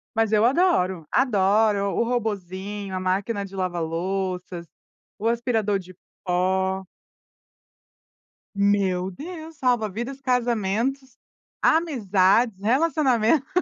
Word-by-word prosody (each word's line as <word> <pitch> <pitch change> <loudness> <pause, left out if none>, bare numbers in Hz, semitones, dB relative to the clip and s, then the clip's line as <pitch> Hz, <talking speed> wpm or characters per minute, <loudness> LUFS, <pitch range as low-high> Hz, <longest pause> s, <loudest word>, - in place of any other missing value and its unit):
Mas 225 -1 +2
eu 215 +1 +4
adoro, 210 - +2
adoro. 205 -3 +2
O 235 - +2
robôzinho, 205 -4 -3
a 185 - -2
máquina 200 +3 -1
de 195 0 -10
lavar 180 -2 -2
louças, 180 +1 -3 0.5
o 220 - -4
aspirador 230 -4 +1
de 185 -1 -12 0.3
pó. 190 +1 0 1.7
Meu 195 -2 +1
Deus! 320 - -9
Salva 245 -5 +1
vidas, 240 +7 -6
casamentos, 250 +1 -1 0.5
amizades, 225 - +3
relacionamentos. 265 0 +2
205 Hz, 95 wpm, -24 LUFS, 190-245 Hz, 1.7 s, eu